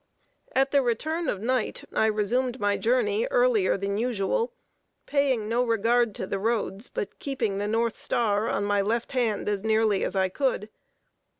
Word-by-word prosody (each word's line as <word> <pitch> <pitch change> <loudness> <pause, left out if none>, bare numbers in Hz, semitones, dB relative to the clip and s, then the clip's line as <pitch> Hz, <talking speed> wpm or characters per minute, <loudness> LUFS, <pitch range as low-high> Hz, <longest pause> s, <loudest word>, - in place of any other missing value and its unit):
At 270 +1 +2
the 280 - +4
return 310 +6 -1
of 195 - -2
night, 250 0 -1
I 220 - +3
resumed 240 +4 0
my 205 0 +1
journey 460 - +1
earlier - - +3
than 200 +1 -2
usual; 245 - 0 0.5
paying 270 -7 +1
no 235 +3 +1
regard 230 0 +2
to - - -3
the 195 +1 -3
roads, 220 0 -2
but 200 - -5
keeping 230 -8 -2
the 205 - -1
north 225 +1 0
star 215 -1 0
on 200 - 0
my 205 0 +2
left 225 +4 -1
hand, 235 -5 0
as 205 -1 -1
nearly 220 -2 +2
as - - -2
I 190 -1 +3
could. 220 0 -1
230 Hz, 170 wpm, -26 LUFS, 205-265 Hz, 0.5 s, the